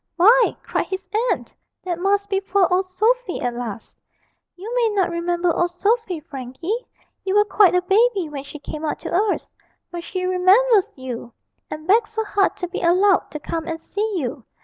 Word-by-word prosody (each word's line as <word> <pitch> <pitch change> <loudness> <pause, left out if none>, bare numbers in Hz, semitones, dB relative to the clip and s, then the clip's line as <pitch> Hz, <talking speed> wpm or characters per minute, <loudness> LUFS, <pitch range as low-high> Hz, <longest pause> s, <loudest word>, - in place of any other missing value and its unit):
'Why,' 455 +7 +5
cried - - -2
his 380 0 -5 0.2
aunt, - - -2 0.3
'that 350 -2 -3
must 400 +2 +1
be 390 -1 0
poor 390 -1 +2
old 370 +1 +2
Sophy 435 +2 0
at 245 -1 -2
last 230 -3 -7 0.6
you 415 +6 -7
may 480 -2 +2
not 380 -3 +2
remember 345 0 0
old 350 - +1
Sophy, 400 0 0
Frankie; 300 - -5 0.4
you 385 +1 -1
were 415 0 +5
quite 395 -2 +4
a 360 - +2
baby 400 -1 +2
when 285 -2 -6
she 285 +2 -9
came 300 +1 -7
out 305 - -1
to - - -5
us; 400 +3 +1 0.4
but 345 -1 -6
she 365 +1 -4
remembers 380 +4 +4
you, 250 -3 -7 0.4
and 310 0 -7
begged 415 +4 +4
so 445 0 -3
hard 410 -2 +1
to 360 - -3
be 350 - -5
allowed 370 +3 +3
to 300 - -6
come 325 +2 -4
and 325 -1 -3
see 420 +6 -3
you. 260 -4 -4
370 Hz, 190 wpm, -22 LUFS, 330-410 Hz, 0.6 s, Why